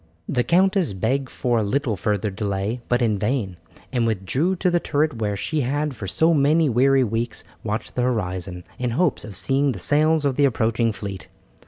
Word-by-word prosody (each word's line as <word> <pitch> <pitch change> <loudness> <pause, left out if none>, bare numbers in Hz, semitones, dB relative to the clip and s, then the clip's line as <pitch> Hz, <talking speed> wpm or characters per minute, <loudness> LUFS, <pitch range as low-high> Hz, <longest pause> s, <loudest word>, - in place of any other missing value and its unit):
The 125 -3 +1
countess 185 - +2
begged 130 +8 -1
for 120 -2 0
a - - 0
little 120 +2 0
further 105 +1 -1
delay, 100 +4 -2
but 120 0 +2
in 105 -3 +1
vain, 105 -5 -1 0.4
and 120 -2 +1
withdrew 120 - 0
to 180 0 +1
the 175 - +3
turret 150 -5 0
where 105 -2 -1
she 155 +8 -1
had 145 +2 -1
for 105 -3 -6
so 160 - +3
many 155 +2 +3
weary 135 +2 +4
weeks 115 +1 -2 0.2
watched 105 0 -3
the 125 - -1
horizon, 95 -7 -2 0.2
in 125 -1 -1
hopes 175 -5 +1
of 105 - -8
seeing 135 +5 +1
the - - -7
sails 150 - +2
of 135 -2 0
the 145 - +5
approaching 115 -2 +1
fleet. 100 -1 -7
120 Hz, 190 wpm, -23 LUFS, 105-145 Hz, 0.4 s, the